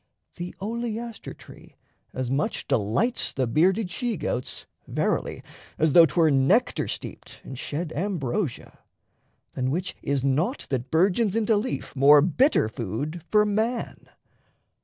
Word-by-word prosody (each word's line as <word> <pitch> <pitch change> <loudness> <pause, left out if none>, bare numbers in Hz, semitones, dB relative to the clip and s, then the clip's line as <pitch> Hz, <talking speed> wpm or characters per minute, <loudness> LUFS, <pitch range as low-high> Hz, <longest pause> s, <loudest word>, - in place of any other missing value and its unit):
The 175 0 -6
oleaster 230 +2 -4
tree - - -15 0.4
as 130 -1 -3
much 140 +3 -1
delights 115 - +1
The 130 - 0
bearded 180 - +2
she 235 +1 -2
goats, 125 -4 -4 0.2
verily - - -1 0.3
as 155 -2 +2
though 170 -2 +8
'Twere 160 -2 +3
nectar 145 - +2
steeped - - -7
and 135 - -8
shed 155 +5 -4
ambrosia; 165 - -3 0.7
Than 130 0 -1
which 175 +6 -2
is 140 -2 -1
naught 155 - 0
that 125 -3 -2
burgeons 190 +5 +2
into 225 -1 +2
leaf 220 - -3
More 145 +2 +7
bitter 185 - +3
food 120 - -5
for 210 0 +4
man. 220 +4 -2
170 Hz, 130 wpm, -25 LUFS, 135-215 Hz, 0.7 s, though